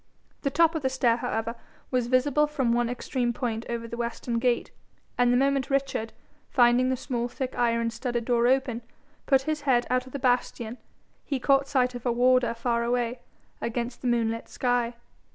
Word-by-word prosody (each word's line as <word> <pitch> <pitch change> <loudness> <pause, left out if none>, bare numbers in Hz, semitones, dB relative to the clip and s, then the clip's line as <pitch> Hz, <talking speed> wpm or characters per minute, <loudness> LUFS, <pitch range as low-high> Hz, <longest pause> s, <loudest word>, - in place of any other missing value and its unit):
The 275 - 0
top 330 +3 +3
of 320 - -2
the 265 - +1
stair, 245 -3 +2
however, 225 -1 -2 0.4
was 250 -2 +1
visible 285 +4 +3
from 265 -6 0
one 240 0 +1
extreme 245 0 -2
point 230 -2 -3
over 230 -1 -3
the 235 - -6
western 235 0 -2
gate, 240 -1 0 0.4
and 245 0 +3
the 245 - +4
moment 275 0 +1
Richard, 275 -5 -1 0.4
finding 245 0 +4
the 260 - 0
small 240 -2 -2
thick 255 +1 -5
iron 230 -1 +1
studded 240 0 -3
door 240 -1 +3
open, 260 -2 +1 0.5
put 270 -2 +4
his 310 +1 -2
head 255 -4 +2
out 255 0 +1
of - - -12
the - - -2
bastion, 245 -2 -1 0.4
he 275 -2 -2
caught 275 +2 +3
sight 255 -3 +1
of 245 -1 -7
a - - +3
warder 250 0 +3
far 235 0 0
away, 240 0 -1 0.4
against 235 +1 -3
the 255 - -2
moonlit 230 -1 0
sky. 245 -1 0
245 Hz, 185 wpm, -27 LUFS, 235-260 Hz, 0.5 s, the